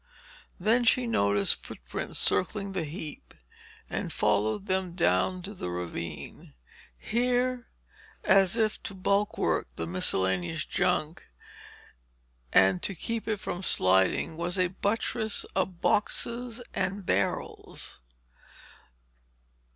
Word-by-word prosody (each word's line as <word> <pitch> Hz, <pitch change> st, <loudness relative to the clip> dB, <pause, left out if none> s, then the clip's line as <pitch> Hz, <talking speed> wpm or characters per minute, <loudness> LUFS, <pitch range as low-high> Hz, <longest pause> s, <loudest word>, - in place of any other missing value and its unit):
Then 230 Hz, +3 st, +3 dB
she 245 Hz, +2 st, +4 dB
noticed 100 Hz, -, +2 dB
footprints -, -, -6 dB
circling 195 Hz, +1 st, 0 dB
the 185 Hz, -4 st, -2 dB
heap 155 Hz, -1 st, -8 dB, 0.5 s
and -, -, -3 dB
followed 105 Hz, -, +1 dB
them 185 Hz, -2 st, 0 dB
down 180 Hz, +1 st, +1 dB
to 200 Hz, +3 st, -6 dB
the 135 Hz, -, -5 dB
ravine. 85 Hz, -5 st, -6 dB, 0.4 s
Here, 245 Hz, -, 0 dB, 0.6 s
as 195 Hz, +2 st, +4 dB
if 220 Hz, -2 st, +1 dB
to 200 Hz, -, -5 dB
bulwark 200 Hz, -, +1 dB
the 80 Hz, -, -3 dB
miscellaneous 90 Hz, 0 st, +1 dB
junk 155 Hz, +3 st, 0 dB, 1.2 s
and 95 Hz, -1 st, +5 dB
to 195 Hz, -, -1 dB
keep 230 Hz, +7 st, -3 dB
it 215 Hz, -1 st, 0 dB
from 180 Hz, -3 st, -4 dB
sliding, 95 Hz, -, +3 dB
was 175 Hz, +2 st, -1 dB
a 180 Hz, -1 st, +2 dB
buttress 210 Hz, +2 st, -1 dB
of 185 Hz, -2 st, -1 dB
boxes 235 Hz, +3 st, 0 dB
and 190 Hz, +1 st, -2 dB
barrels. -, -, -2 dB
185 Hz, 105 wpm, -28 LUFS, -, 1.2 s, and